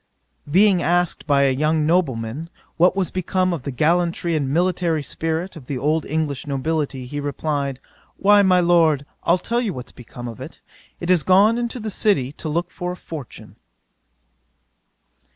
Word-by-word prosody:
'Being 190 +2 +4
asked 175 -1 0
by 140 -2 +4
a 135 - +3
young 155 +3 +1
nobleman, 150 -3 -1 0.3
what 180 +2 +4
was 190 -2 -1
become 185 0 0
of 165 - -4
the 140 - -5
gallantry 170 +4 +1
and 140 -4 -1
military 170 -1 +1
spirit 165 +6 -3
of 140 -6 -12
the 140 - -3
old 155 +4 0
English 150 -3 -2
nobility, 140 -1 -2
he 145 +4 -5
replied, 145 -1 -2 0.4
"Why, 205 +1 +5
my 185 -2 +4
Lord, 165 -5 +3 0.2
I'll 170 - +3
tell 235 +6 -1
you 215 -6 -2
what 125 -1 -8
is - - -9
become 120 0 -10
of 120 +2 -8
it; 140 +5 -9 0.4
it 175 +1 -1
is 180 -3 +4
gone 205 +7 +4
into 240 +1 -3
the 215 -1 -4
city 165 -11 +1
to 155 - -4
look 170 +3 -2
for 180 0 -4
a - - -10
fortune." 150 -10 -10
160 Hz, 170 wpm, -21 LUFS, 140-180 Hz, 0.4 s, Why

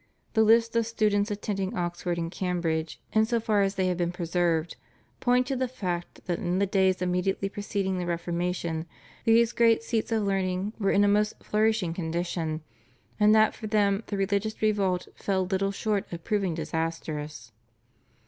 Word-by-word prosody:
The 220 - +4
lists 230 +1 +4
of 230 -1 +2
students 210 -2 +1
attending 200 -2 -3
Oxford 175 0 -2
and 165 0 -3
Cambridge 170 -4 -2
in 220 0 +4
so 235 0 +1
far 215 -2 +2
as 195 0 +1
they 190 - +1
have 180 -1 0
been 175 -1 0
preserved 170 -2 0 0.4
point 250 0 +3
to 270 +1 -2
the 260 0 0
fact 180 -8 -4
that 175 -2 -1
in 175 +1 -1
the 200 - +3
days 190 -1 +2
immediately 180 +2 0
preceding 195 -2 -2
the 175 - -3
Reformation 170 -1 -2 0.4
these 230 0 +5
great 230 -1 +3
seats 230 0 -1
of 220 -2 +1
learning 195 0 -1
were 195 -2 +1
in 205 - +4
a - - +4
most 210 +1 +2
flourishing 215 -5 +1
condition, 165 -2 -2 0.6
and 210 +1 +6
that 215 0 +5
for 215 - -7
them 205 -1 +2
the 205 - -3
religious 200 +2 -1
revolt 200 -4 +1
fell 190 -2 -1
little 195 +1 0
short 205 0 -2
of 170 -1 -6
proving 200 -6 0
disastrous. 155 -7 -4
195 Hz, 170 wpm, -27 LUFS, 175-215 Hz, 0.6 s, and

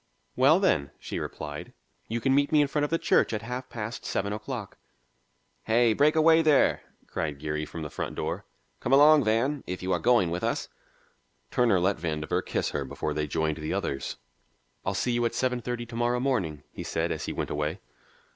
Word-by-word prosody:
"Well, 140 +7 +5
then," 75 - +2
she - - -5
replied, 75 -1 -6 0.3
"you 115 +1 -2
can 135 +3 +2
meet 145 +2 +3
me 155 - +5
in 145 - +4
front 145 +1 0
of - - -4
the 165 - +2
church - - +2
at 105 -1 -3
half 125 +2 -5
past 110 0 -5
seven 100 +1 -2
o'clock." 105 -1 -6 0.9
"Hey, 115 0 +4
break 150 +6 +3
away 160 +1 +6
there!" 155 -3 +4 0.2
cried 75 -3 -3
Geary 75 +1 -3
from 80 - -6
the 75 - -5
front - - -4
door. - - -3 0.4
"Come 130 - -1
along, 150 +1 +7
Van, 125 +6 +1
if 90 0 -5
you 95 - -1
are - - +2
going 120 -8 +3
with 85 - -3
us." - - -1 0.8
Turner 115 -7 +3
let 95 +3 +1
Vandover 75 -2 -1
kiss - - -2
her - - -2
before 75 - -3
they 75 0 -1
joined 80 0 -1
the 75 -1 -3
others. 70 - -3 0.7
"I'll - - -1
see 125 - 0
you 120 0 +1
at 115 - -1
seven 125 -1 0
thirty 120 0 -4
to 115 0 -10
morrow 120 +1 +1
morning," 100 - -1
he - - -8
said - - -1
as - - -3
he - - -3
went - - -3
away. 75 +5 -2
115 Hz, 205 wpm, -27 LUFS, 80-135 Hz, 0.9 s, along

